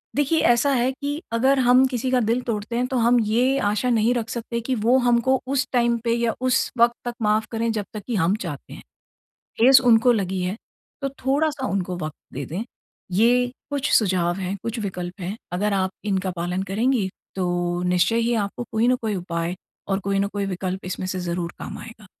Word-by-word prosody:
देखिए, 290 Hz, +3 st, +2 dB
ऐसा 240 Hz, +4 st, +3 dB
है 250 Hz, +1 st, +2 dB
कि 285 Hz, +4 st, -4 dB
अगर 265 Hz, +4 st, +3 dB
हम 250 Hz, +1 st, +5 dB
किसी 255 Hz, 0 st, -2 dB
का 255 Hz, -, +4 dB
दिल 230 Hz, +2 st, +1 dB
तोड़ते 220 Hz, +1 st, -3 dB
हैं, 250 Hz, +1 st, 0 dB
तो 260 Hz, -, -2 dB
हम 240 Hz, +1 st, +4 dB
ये 250 Hz, +5 st, +2 dB
आशा 210 Hz, +4 st, 0 dB
नहीं 230 Hz, 0 st, +3 dB
रख 230 Hz, -2 st, -2 dB
सकते 235 Hz, 0 st, -4 dB
कि 255 Hz, +3 st, -1 dB
वो 235 Hz, +3 st, +3 dB
हमको 245 Hz, +2 st, +3 dB
उस 270 Hz, 0 st, 0 dB
टाइम 235 Hz, -1 st, +3 dB
पे 230 Hz, -, +2 dB
या 235 Hz, -1 st, 0 dB
उस 255 Hz, -2 st, +1 dB
वक़्त 235 Hz, 0 st, +4 dB
तक 240 Hz, -, -3 dB
माफ़ 215 Hz, +1 st, +2 dB
करें, 230 Hz, 0 st, 0 dB
जब 210 Hz, -2 st, -3 dB
तक 210 Hz, -, -6 dB
कि 240 Hz, -, -1 dB
हम 185 Hz, +1 st, +2 dB
चाहते 145 Hz, -5 st, -7 dB
हैं। -, -, -10 dB, 0.8 s
ठेस 260 Hz, +3 st, +7 dB
उनको 235 Hz, +2 st, +5 dB
लगी 190 Hz, -4 st, -1 dB
है, 185 Hz, +4 st, -2 dB, 0.5 s
तो 275 Hz, -, 0 dB, 0.2 s
थोड़ा-सा 285 Hz, 0 st, +1 dB
उनको 185 Hz, -2 st, -2 dB
वक़्त 155 Hz, -2 st, -5 dB, 0.2 s
दे 140 Hz, +1 st, -4 dB
दें। 185 Hz, +8 st, -4 dB, 0.5 s
ये 245 Hz, +5 st, +3 dB, 0.2 s
कुछ 280 Hz, -2 st, -1 dB
सुझाव 180 Hz, -5 st, +2 dB
हैं, 190 Hz, +1 st, -3 dB
कुछ 230 Hz, +1 st, -4 dB
विकल्प 180 Hz, -2 st, -5 dB
हैं। 190 Hz, +5 st, -4 dB, 0.2 s
अगर 200 Hz, +3 st, 0 dB
आप 190 Hz, -1 st, +1 dB
इनका 190 Hz, -2 st, 0 dB
पालन 180 Hz, +2 st, -2 dB
करेंगी, 230 Hz, -2 st, +1 dB, 0.3 s
तो 175 Hz, -1 st, -1 dB
निश्चय 180 Hz, +5 st, +2 dB
ही 240 Hz, -, +2 dB
आपको 240 Hz, -, -7 dB
कोई 225 Hz, +2 st, +2 dB
न 255 Hz, -, +4 dB
कोई 220 Hz, -2 st, -1 dB
उपाय 170 Hz, 0 st, -3 dB, 0.3 s
और 195 Hz, -1 st, +1 dB
कोई 200 Hz, 0 st, 0 dB
न 200 Hz, -, +2 dB
कोई 200 Hz, -1 st, -2 dB
विकल्प 185 Hz, 0 st, -4 dB
इसमें 185 Hz, 0 st, -4 dB
से 185 Hz, 0 st, -3 dB
ज़रूर 175 Hz, 0 st, -3 dB
काम -, -, -7 dB
आएगा। 225 Hz, -3 st, -11 dB
225 Hz, 205 wpm, -23 LUFS, 190-245 Hz, 0.8 s, ठेस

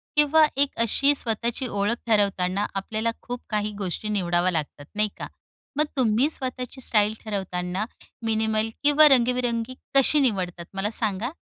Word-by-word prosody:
किंवा 300 Hz, +1 st, +5 dB
एक 280 Hz, 0 st, +3 dB
अशी 275 Hz, +6 st, +3 dB
स्वतःची 235 Hz, +2 st, -2 dB
ओळख 205 Hz, +2 st, 0 dB
ठरवताना, 200 Hz, -2 st, +1 dB
आपल्याला 215 Hz, +4 st, -2 dB
खूप 245 Hz, 0 st, -6 dB
काही 210 Hz, -1 st, -1 dB
गोष्टी 200 Hz, +2 st, -3 dB
निवडाव्या 180 Hz, -2 st, +1 dB
लागतात 150 Hz, -3 st, -4 dB
नाही 210 Hz, 0 st, +2 dB
का, -, -, -6 dB, 0.5 s
मग 300 Hz, -, +2 dB
तुम्ही 245 Hz, +2 st, +3 dB
स्वतःची 260 Hz, -2 st, -4 dB
स्टाईल 210 Hz, -2 st, +2 dB
ठरवताना 190 Hz, -1 st, -3 dB, 0.4 s
मिनिमल 220 Hz, 0 st, 0 dB
किंवा 295 Hz, +1 st, +7 dB
रंगीबिरंगी 245 Hz, -2 st, +1 dB, 0.2 s
कशी 275 Hz, +2 st, +5 dB
निवडतात? 185 Hz, -9 st, -1 dB
मला 195 Hz, +2 st, -1 dB
सांगा. 215 Hz, 0 st, 0 dB
220 Hz, 135 wpm, -25 LUFS, 200-250 Hz, 0.5 s, किंवा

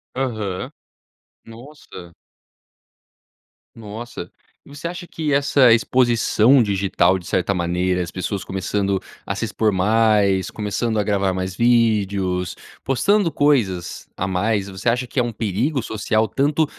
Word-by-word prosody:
Aham. 110 Hz, -8 st, -3 dB, 0.7 s
Nossa. 115 Hz, -, -12 dB, 1.6 s
Nossa. 110 Hz, -4 st, -8 dB, 0.4 s
E -, -, -17 dB
você 145 Hz, +4 st, -6 dB
acha 175 Hz, +1 st, -6 dB
que 155 Hz, -4 st, -2 dB
essa 140 Hz, -4 st, +5 dB
exposição 120 Hz, +1 st, +3 dB
digital, 95 Hz, -3 st, +1 dB
de 90 Hz, -, -14 dB
certa 95 Hz, +2 st, 0 dB
maneira, 90 Hz, +1 st, 0 dB
as 85 Hz, -, -7 dB
pessoas 95 Hz, +1 st, -4 dB
começando 95 Hz, 0 st, -1 dB, 0.2 s
a -, -, -3 dB
se -, -, -4 dB
expor 110 Hz, -1 st, 0 dB
mais, 100 Hz, -1 st, +2 dB
começando 110 Hz, +2 st, -2 dB
a -, -, +2 dB
gravar 100 Hz, -2 st, 0 dB
mais 95 Hz, 0 st, -4 dB
vídeos, 100 Hz, -6 st, +1 dB, 0.3 s
postando 180 Hz, -, +2 dB
coisas 110 Hz, -13 st, 0 dB
a 95 Hz, -, -2 dB
mais, 100 Hz, +2 st, 0 dB
você 95 Hz, +4 st, -7 dB
acha 125 Hz, +2 st, 0 dB
que 130 Hz, -, -2 dB
é 125 Hz, -, +3 dB
um 120 Hz, -, -4 dB
perigo 115 Hz, -, -1 dB
social, 110 Hz, 0 st, 0 dB
tanto 145 Hz, +3 st, +1 dB
110 Hz, 130 wpm, -21 LUFS, 95-125 Hz, 1.6 s, essa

